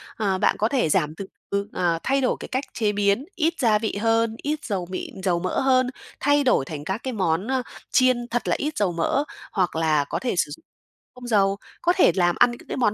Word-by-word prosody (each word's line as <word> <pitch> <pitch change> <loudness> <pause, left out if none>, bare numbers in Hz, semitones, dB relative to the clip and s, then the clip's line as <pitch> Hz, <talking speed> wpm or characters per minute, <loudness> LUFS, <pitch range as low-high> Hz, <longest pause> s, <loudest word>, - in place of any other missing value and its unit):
ờ, 200 -3 0
bạn 205 - +2
có 215 - +3
thể 250 - +1
giảm 155 -2 +1
từ 195 - -6 0.2
từ, 200 0 -1
ờ, 170 -2 +1
thay 275 +1 +1
đổi 255 - +1
cái - - -7
cách 260 +2 -2
chế 215 -3 +1
biến, 205 +5 +1
ít 330 -1 +1
gia 220 -4 +3
vị 220 -2 -2
hơn, 225 0 +2
ít 300 +1 -2
dầu 190 -5 -2
mịn 190 0 -6
dầu 180 -3 +1
mỡ 185 +1 -1
hơn, 255 -1 +3 0.3
thay 290 +1 +3
đổi 250 - +3
thành 145 0 -6
các 190 +8 -4
cái 260 - -3
món, 185 -2 0
ơ, 260 -1 0 0.3
chiên 255 -2 +3
thật 240 +1 -1
là - - +2
ít 300 +1 -3
dầu 200 -4 +1
mỡ, 170 - 0 0.3
hoặc 185 -5 0
là 155 -3 +2
có - - -2
thể 250 - -2
sử 145 - +1
dụng 145 - -10 0.5
không 250 -1 -9
dầu. 200 -3 +2 0.2
Có 350 - +3
thể 365 - +5
làm 175 -2 +2
ăn 245 - +5
những 240 - -11
cái - - -3
món 235 -5 +2
215 Hz, 240 wpm, -24 LUFS, 185-255 Hz, 0.5 s, thể